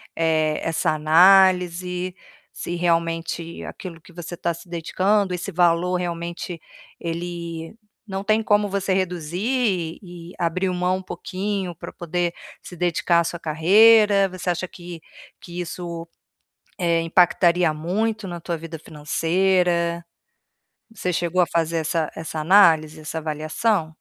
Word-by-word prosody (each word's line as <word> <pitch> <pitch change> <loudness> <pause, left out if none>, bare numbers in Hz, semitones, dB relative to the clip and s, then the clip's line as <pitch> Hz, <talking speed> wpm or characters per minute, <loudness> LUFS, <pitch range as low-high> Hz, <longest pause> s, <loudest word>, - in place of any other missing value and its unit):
eh, 155 -2 +1
essa 165 - +1
análise 180 +2 +4 0.4
se 175 - -5
realmente 165 -1 -1
aquilo 170 -3 -9
que 180 - -17
você 175 0 -8
está 170 0 -1
se 170 +3 -13
dedicando 185 +4 0
esse 180 +3 -4
valor 175 0 +2
realmente 170 0 -5 0.4
ele 170 0 -5 0.3
não 195 -1 -4
tem 215 +1 +2
como 210 -1 +2
você 195 0 -2
reduzir 185 +1 -1
e 175 -2 -11
abrir 175 +3 0
um - - -2
mão 180 +1 0
um - - -7
pouquinho 185 +1 -4
para - - -9
poder 175 0 -2 0.3
se 180 - -11
dedicar 175 0 +1
à - - +2
sua 170 +1 -4
carreira? 200 +6 +5
Você 185 0 -5
acha 180 +1 -1
que 175 -1 -10 0.4
que 175 0 -8
isso, 170 -1 -6 0.7
eh, 170 -2 +2
impactaria 175 0 +3
muito 210 +7 -2
na 175 -1 -6
tua 170 0 -3
vida 165 +1 -8
financeira? 170 +2 0 0.9
Você 180 -4 -2
chegou 175 +1 +1
a - - +2
fazer 165 0 0
essa 160 0 -1
essa 160 0 -6
análise, 160 -3 +4
essa 155 +1 -5
avaliação? 160 +4 -1
175 Hz, 135 wpm, -23 LUFS, 165-185 Hz, 0.9 s, carreira